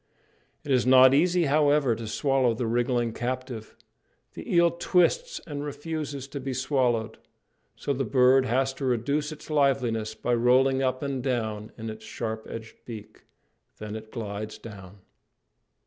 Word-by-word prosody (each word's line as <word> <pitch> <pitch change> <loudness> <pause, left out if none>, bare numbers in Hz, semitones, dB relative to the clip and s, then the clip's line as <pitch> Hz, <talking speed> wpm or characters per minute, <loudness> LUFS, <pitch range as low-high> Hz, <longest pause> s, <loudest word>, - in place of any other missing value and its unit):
It 145 - -4
is 125 -1 +3
not 130 0 +8
easy, 175 +4 +3
however, 145 -3 +3
to 115 0 -7
swallow 130 0 +1
the 120 - -2
wriggling 120 0 0
captive. 125 -2 -5 0.6
The - - -8
eel 170 -1 +5
twists, 480 - +1
and 145 -3 -5
refuses 145 -2 -5
to 140 - -5
be 135 -1 -4
swallowed; 125 -4 0 0.6
so 140 - -2
the 135 0 -1
bird 130 +3 +4
has 130 +2 +1
to 135 - -5
reduce 140 +5 0
its 155 0 -10
liveliness 125 -7 +1
by 120 - -1
rolling 130 +3 +3
up 130 +1 -1
and 140 -2 -2
down 110 -4 -2
in 110 -1 -5
its 110 - -11
sharp 110 -1 -5
edged 110 -1 -8
beak. 110 -3 -10 0.5
Then 105 0 -6
it 110 0 -9
glides 105 -2 -5
down. 100 -3 -12
130 Hz, 150 wpm, -26 LUFS, 115-140 Hz, 0.6 s, not